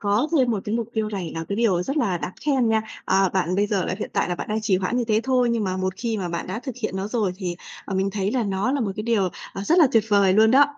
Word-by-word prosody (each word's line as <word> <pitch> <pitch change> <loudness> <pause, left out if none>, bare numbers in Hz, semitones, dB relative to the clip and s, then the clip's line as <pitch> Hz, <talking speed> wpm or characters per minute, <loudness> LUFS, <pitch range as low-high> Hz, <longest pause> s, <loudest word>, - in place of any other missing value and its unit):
có 210 +8 +1
thêm 255 -2 +3
một 210 -4 0
cái 210 - -2
mục 230 -2 -1
tiêu 220 -1 0
này 190 -6 -4
là 165 - -4
cái 200 - -2
điều 200 -7 +2
rất 275 +11 -3
là 195 - +1
đáng 180 - -5
khen 260 -4 +2
nha. 220 0 +2 0.2
Ờ, 190 0 +3
bạn, 185 -1 0
bây 205 +1 +2
giờ 200 -4 0
là - - -2
hiện - - -4
tại - - 0
là 175 - 0
bạn - - -6
đang 215 +1 -1
trì 210 -3 +2
hoãn 190 +6 -1
như 245 - +1
thế 215 0 +3
thôi. 255 -2 +2
Nhưng 230 -3 0
mà 185 0 -1
một 185 0 -2
khi 230 0 -2
mà 180 -3 -3
bạn 170 0 -4
đã 190 +5 -4
thực 260 -1 -6
hiện 190 -3 -2
nó 195 +2 -3
rồi 215 -5 0
thì, 180 -3 -4 0.3
ờ, 195 - -5
mình 195 +1 +1
thấy 200 0 -1
là 250 -3 +1
nó 200 +5 0
là 285 - 0
một 205 -4 -1
cái 215 - -3
điều, 215 -5 +1 0.2
ờ, 195 - -5
rất 335 - +3
là 315 - +7
tuyệt 225 -2 +4
vời 200 -2 +4
luôn 220 +3 +5
đó. 275 +4 +7
210 Hz, 325 wpm, -23 LUFS, 190-235 Hz, 0.3 s, là